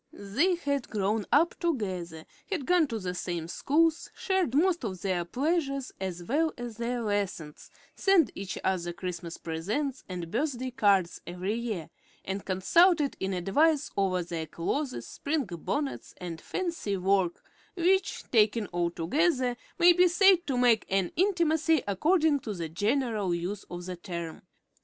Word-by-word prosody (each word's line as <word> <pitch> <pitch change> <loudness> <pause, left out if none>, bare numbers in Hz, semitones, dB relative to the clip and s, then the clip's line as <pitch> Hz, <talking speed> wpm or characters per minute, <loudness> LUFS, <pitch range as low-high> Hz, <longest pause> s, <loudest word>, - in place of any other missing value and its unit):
They 275 - +1
had 280 -6 -2
grown 210 0 -1
up 330 +4 +4
together, 185 - -2 0.2
had 340 -10 -2
gone 355 -1 +4
to 230 - -3
the 185 -4 -3
same 175 -2 -4
schools, 320 - +1
shared 380 -9 0
most 340 +1 +3
of 190 -5 -4
their 185 -3 0
pleasures 275 - -1
as 180 -2 -4
well 305 - +1
as 240 -2 -6
their 235 0 -2
lessons, 200 -8 -3 0.3
sent 370 - +4
each 195 -1 -5
other 175 -2 -1
Christmas 175 -2 -5
presents 215 - -3
and 175 -2 -5
birthday 255 -1 -1
cards 200 -8 +2
every 180 +4 -3
year, 220 -8 -4 0.3
and 195 +1 -3
consulted 300 - +3
in 190 - -2
advance 285 - +2
over 185 -2 +1
their 165 -2 -5
clothes, 255 - -3
spring 290 -1 -2
bonnets, 215 - -4
and 170 -3 -6
fancy 335 - -2
work, 190 -1 +1 0.3
which, 375 +2 +1
taken 220 -1 +3
all 175 -1 0
together, 255 - +1 0.2
may 350 -1 +7
be 360 +1 +5
said 365 0 +4
to 265 -3 0
make 240 -3 +4
an 190 -2 +1
intimacy 325 -5 +2
according 305 - +3
to 215 -5 -5
the 165 -3 -4
general 210 - 0
use 185 +4 -4
of 175 0 -6
the 185 0 -5
term. 170 -3 -6
220 Hz, 150 wpm, -29 LUFS, -, 0.3 s, may